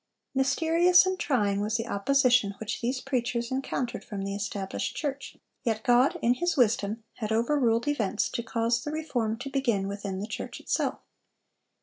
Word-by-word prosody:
Mysterious 330 +7 +4
and 375 0 -1
trying 205 -8 +1
was 210 +2 0
the 230 - -3
opposition 245 -1 +3
which 220 - -4
these 250 +2 -1
preachers 240 -3 -2
encountered 260 -2 -2
from 200 -3 -5
the 195 0 -3
established 200 -1 -3
church; 280 -2 -4 0.3
yet 220 -3 -1
God, 245 +2 +4
in 235 - +5
His 350 +4 -1
wisdom, 220 -2 +2
had 215 -2 -3
overruled 235 +1 +2
events 220 -8 0
to - - -3
cause 230 0 0
the - - -4
reform 265 -8 -2
to 255 +4 -7
begin 235 -8 +1
within 200 -1 -4
the 200 - -3
church - - -6
itself. - - -1
235 Hz, 160 wpm, -28 LUFS, 215-275 Hz, 0.3 s, in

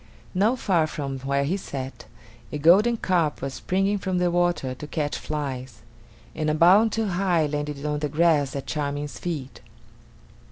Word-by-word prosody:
Not 210 +7 +2
far 175 -9 +2
from 140 -3 -4
where 140 +1 0
he 170 +8 0
sat, 135 -8 -7 0.5
a - - -3
golden 195 +10 +5
carp 170 -7 +1
was 135 0 -4
springing 195 +5 0
from 190 -1 -2
the 180 -1 +2
water 175 -7 +1
to 145 +4 -8
catch 150 -1 -2
flies, 130 -6 -5 0.5
and 155 -1 -1
a 155 - +1
bound 190 +8 +6
too 225 +1 0
high 180 -4 +1
landed 145 0 -3
it 140 - -8
on 150 0 -1
the 150 0 -2
grass 150 -3 +2
at 140 - -4
Charming's 145 -1 -3
feet. 150 -7 -5
155 Hz, 170 wpm, -25 LUFS, 140-180 Hz, 0.5 s, bound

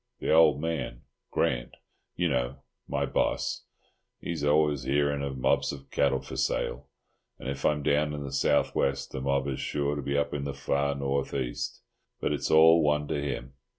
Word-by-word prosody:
The - - 0
old 80 -3 +6
man—Grant, 65 -5 -3 0.4
you - - +1
know—my 65 +2 -3
boss—he's 85 -4 -4
always 75 -1 +3
hearing 70 +2 +1
of 70 -1 -3
mobs 65 - +2
of 70 -1 -10
cattle 70 -1 +2
for - - -7
sale, 65 +4 -1 0.5
and - - -8
if 70 0 -4
I'm 75 -1 +2
down 75 +2 +2
in 75 - -5
the 70 - -6
south 70 +1 +2
west 70 0 0
the 65 - -4
mob 70 0 0
is 65 -2 -3
sure 70 0 -1
to 70 - -3
be 70 +1 -1
up 70 - 0
in 70 -1 -2
the 70 -1 -4
far 70 0 0
north 70 0 -1
east, 65 -3 -3 0.4
but - - 0
it's 70 - -2
all 80 +1 +7
one 75 -1 +1
to 70 - -1
him. 65 -2 -4
70 Hz, 175 wpm, -28 LUFS, 70-75 Hz, 0.5 s, all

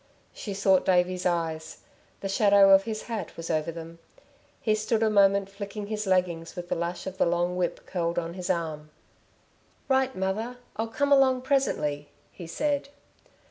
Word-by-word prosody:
She 200 -3 -6
sought 190 -1 +3
Davey's 180 0 +2
eyes. 165 -2 -3 0.4
The 195 - -2
shadow 200 0 +5
of 195 0 +6
his 220 -1 -4
hat 220 -7 -5
was 165 0 -4
over 155 +1 0
them. 165 0 -9 0.6
He 215 - +1
stood 215 +1 0
a 220 - +3
moment 200 -1 +4
flicking 200 +1 -7
his 210 0 -4
leggings 180 -3 0
with 175 0 -7
the - - 0
lash 170 +1 -3
of 190 0 -7
the - - +4
long 175 +1 0
whip 180 -1 -2
curled 170 -2 -2
on 170 -1 -2
his 180 0 -6
arm. 160 -4 -2 1.0
"Right, 265 -1 +2
mother! 215 +6 -2 0.2
I'll 225 +1 -2
come 285 +5 -1
along, 260 -2 +4
presently," 150 - 0 0.2
he 175 - -10
said. 285 - -1
190 Hz, 170 wpm, -27 LUFS, 170-215 Hz, 1.0 s, of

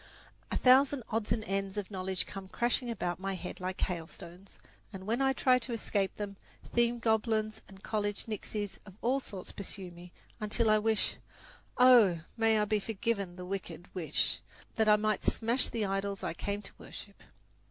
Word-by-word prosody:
A - - 0
thousand 265 +1 +5
odds 220 -1 -1
and 220 - +1
ends 195 0 -2
of 205 0 -3
knowledge 190 -1 -2
come 195 -2 -8
crashing 240 +4 0
about 180 -6 -2
my 195 0 -2
head 180 0 -6
like 185 0 -3
hailstones, 175 +2 -5 0.3
and 190 -2 -8
when 230 +5 0
I 270 0 +4
try 255 -1 +4
to 240 0 -4
escape 200 -3 0
them, 200 -1 -5 0.4
theme 235 0 +3
goblins 220 -1 +1
and 195 0 -15
college 205 -2 -1
nixies 210 -2 -4
of 190 - -12
all 260 +3 +3
sorts 195 -8 -7
pursue 190 -2 -7
me, 175 +1 -12 0.3
until 215 +1 +2
I 215 - +5
wish 220 0 +1 0.6
oh, 235 -9 +7
may 225 -1 +4
I 210 - +3
be 210 0 +1
forgiven 200 -3 -2
the 180 0 -7
wicked 180 -2 -6
wish! 160 -5 0 0.3
that 220 -1 +3
I 210 - +8
might 215 -1 0
smash 235 +3 +2
the 225 -3 -1
idols 195 0 -2
I - - -1
came 205 +1 -3
to - - -9
worship. 200 -1 -10
210 Hz, 175 wpm, -32 LUFS, 190-225 Hz, 0.6 s, I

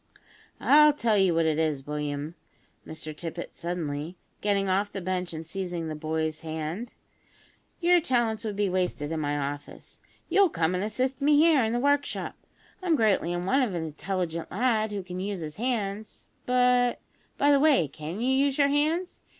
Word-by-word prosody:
"I'll 300 +1 +6
tell 235 -6 +1
you 190 -4 +3
what 165 0 +2
it 160 -1 +1
is, 150 -4 -1
William," 150 +1 -3 0.5
said - - -13
Mr 155 -1 -6
Tippet 170 +2 -6
suddenly, 165 -1 -4 0.2
getting 200 -1 +1
off 195 +2 +1
the 195 - -5
bench 180 -1 -2
and 160 0 -6
seizing 175 -2 -4
the 155 - -4
boy's 155 0 -2
hand, 160 +7 -5 0.8
"your 350 0 +4
talents 235 -7 0
would 215 -2 -3
be 205 0 +1
wasted 180 -5 -1
in 160 - -2
my 145 -1 -1
office. 145 0 -6 0.3
You'll 395 -2 +4
come 165 - 0
and 180 +1 -1
assist 255 +5 -2
me 290 +1 +4
here 310 -4 +5
in 220 - 0
the 240 - 0
workshop. 285 +2 0 0.5
I'm 350 -3 +2
greatly 210 - +2
in 175 0 -2
want 265 +7 +3
of 210 -8 -2
an 165 - -2
intelligent 170 +1 -3
lad 220 0 +1
who 200 -2 -4
can 180 0 -6
use 195 -1 -3
his 155 -1 -6
hands; 215 -3 -3 0.2
but, 250 -1 +3 0.4
by 285 +1 +4
the 280 - +5
way, 280 - +4
can 155 +7 -7
you 255 +3 +1
use 275 -1 -1
your 280 -1 +4
hands? 315 +5 0
195 Hz, 185 wpm, -27 LUFS, 160-250 Hz, 0.8 s, I'll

